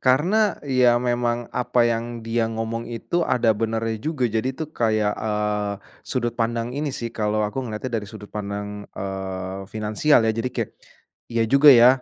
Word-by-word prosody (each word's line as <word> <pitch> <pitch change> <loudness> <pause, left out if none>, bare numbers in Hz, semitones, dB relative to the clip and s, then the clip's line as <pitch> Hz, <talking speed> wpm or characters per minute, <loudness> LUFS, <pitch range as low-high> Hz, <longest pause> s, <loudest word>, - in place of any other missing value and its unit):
karena, 150 +11 +3 0.3
ya 125 -3 +4
memang 120 -1 0
apa 125 0 +2
yang 115 0 +1 0.2
dia 115 0 0
ngomong 115 +1 -3
itu, 120 +9 -2
ada 120 -8 +3
benernya 115 0 -1
juga. 150 -1 -1
Jadi 115 +2 0
tuh 160 -2 -4
kayak, 110 -2 +1
eee, 105 -1 -1 0.4
sudut 120 -3 -1
pandang 115 +1 -1
ini 145 +2 -2
sih, 120 -4 -4
kalau 105 -1 0
aku 105 +6 -2
ngelihatnya 120 +1 -5
dari 105 - -9
sudut 105 -2 -11
pandang, 105 0 -5
eee, 95 0 -4
finansial, 110 +5 +2
ya. 110 - +3
Jadi 115 +3 -2
kayak, 115 -3 -1 0.6
iya 115 -1 +2
juga 140 +2 +7
ya. 120 -2 +9
115 Hz, 165 wpm, -23 LUFS, 105-125 Hz, 0.6 s, ya